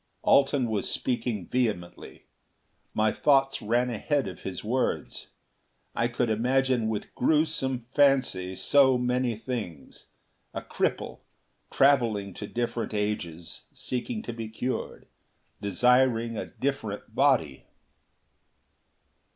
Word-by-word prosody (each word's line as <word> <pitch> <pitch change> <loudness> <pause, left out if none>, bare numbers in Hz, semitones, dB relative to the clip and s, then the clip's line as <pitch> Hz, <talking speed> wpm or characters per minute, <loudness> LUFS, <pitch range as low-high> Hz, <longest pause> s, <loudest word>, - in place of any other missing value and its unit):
Alten 135 -2 +4
was 105 -3 -1
speaking 120 -6 -2
vehemently. 105 -8 -3 0.7
My 110 0 +2
thoughts 135 0 +2
ran 120 +3 +1
ahead 140 +5 -1
of 90 - -7
his 95 -2 -6
words; 125 +5 -2 0.7
I 115 - +1
could 120 -1 -1
imagine 125 +1 +1
with 105 -2 -4
grewsome 135 -4 +1
fancy 130 -10 +2
so 130 +7 +4
many 125 -1 0
things. 110 - -6 0.5
A - - -3
cripple, - - -2 0.5
traveling 115 -8 +2
to 105 - -7
different 120 -2 -3
ages 90 -6 -3
seeking 215 - -3
to 120 - -5
be 115 -1 -6
cured. 125 +3 -4 0.6
Desiring 115 +3 +3
a - - -4
different 115 -6 -4
body.... 120 - +2
120 Hz, 105 wpm, -27 LUFS, 105-130 Hz, 0.7 s, Alten